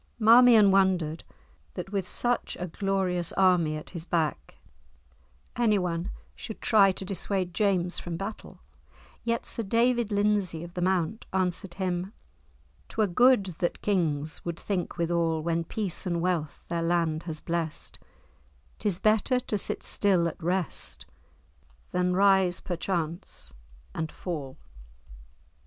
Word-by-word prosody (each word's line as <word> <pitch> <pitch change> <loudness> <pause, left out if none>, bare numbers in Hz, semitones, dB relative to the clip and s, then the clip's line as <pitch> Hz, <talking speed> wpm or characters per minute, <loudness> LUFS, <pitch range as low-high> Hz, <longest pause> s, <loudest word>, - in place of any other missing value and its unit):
Marmion 230 -2 +7
wondered 185 -5 +2 0.5
that 195 - -6
with 195 -3 -2
such 245 +3 -1
a 180 - -2
glorious 185 -1 -1
army 175 -5 +3
at 155 - -8
his 170 -3 -6
back 155 - -2 1.0
anyone 185 -7 +1 0.3
should 220 - -8
try 200 -3 +5
to 190 - -6
dissuade 190 -1 -2
James 185 -3 +1
from 170 -2 -5
battle, 200 +4 -7 0.6
yet 230 0 -1
Sir - - -4
David 230 +1 +1
Lindesay 205 -5 +1
of 175 0 -10
the 180 - -4
Mount 185 +3 0
answered 185 -1 -1
him, 185 +1 -2 0.8
"'twere 220 - +1
good 245 +3 +4
That 175 - -2
Kings 160 -7 0
would 170 -1 -4
think 185 -5 -3
withal, 165 -2 0
When 165 0 0
peace 190 +1 -3
and 170 -1 0
wealth 170 -4 -2
their 170 -1 -2
land 165 -2 +1
has 155 -1 -4
bless'd, 165 -2 -3 0.8
'Tis 205 -5 +2
better 215 +5 +2
to 215 - -3
sit 200 - -1
still 185 -4 +2
at 165 - -7
rest, 180 +1 -2 0.9
Than 180 0 +1
rise, 190 -2 +4
perchance 170 - -4 0.4
to 160 - -2
fall." 145 -7 -6
180 Hz, 130 wpm, -28 LUFS, 170-200 Hz, 1.0 s, Marmion